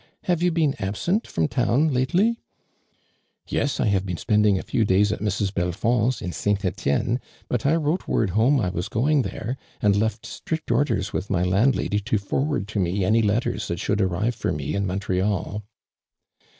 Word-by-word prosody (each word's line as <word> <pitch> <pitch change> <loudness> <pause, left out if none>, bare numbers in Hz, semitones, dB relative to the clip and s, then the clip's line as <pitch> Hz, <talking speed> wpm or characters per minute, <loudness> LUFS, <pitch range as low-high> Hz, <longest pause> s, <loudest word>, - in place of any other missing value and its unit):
Have 175 -2 0
you 180 - +3
been 160 -4 +2
absent 170 - -1
from 80 -1 0
town 130 - +1
lately 180 - +2 0.3
?" - - -43
* - - -41
" - - -46
Yes, 145 - -1
I - - +2
have 100 -3 +2
been 90 -3 -4
spending 105 -1 +3
a - - -4
few 115 - 0
days 100 +1 +3
at - - -2
Mrs. 100 -1 -1
Belfond's, 110 +7 0
in 90 - -3
St. 100 +2 -1
Etienne, 90 - 0 0.3
but 125 +2 -1
I 155 - +4
wrote 165 +2 -1
word 105 -5 +1
home 120 +8 +3
I 95 -6 0
was 90 +3 -4
going 140 +7 +2
there, 120 +1 -4 0.2
an<l 100 -1 +3
left 110 0 -2
strict 160 -4 -4
orders 110 -7 +1
with 95 - -3
my 90 -3 +1
landlsuly 105 +2 +1
to 110 +1 +1
forward 130 +2 -1
to 110 - -2
me 95 +1 0
any 110 +4 +3
letters 105 -1 0
that 85 - -3
should 105 0 0
arrive 95 +6 0
for 110 - -2
me 75 -2 -3
in 100 0 0
Montreal." 95 +2 -1
105 Hz, 190 wpm, -24 LUFS, 95-130 Hz, 0.3 s, I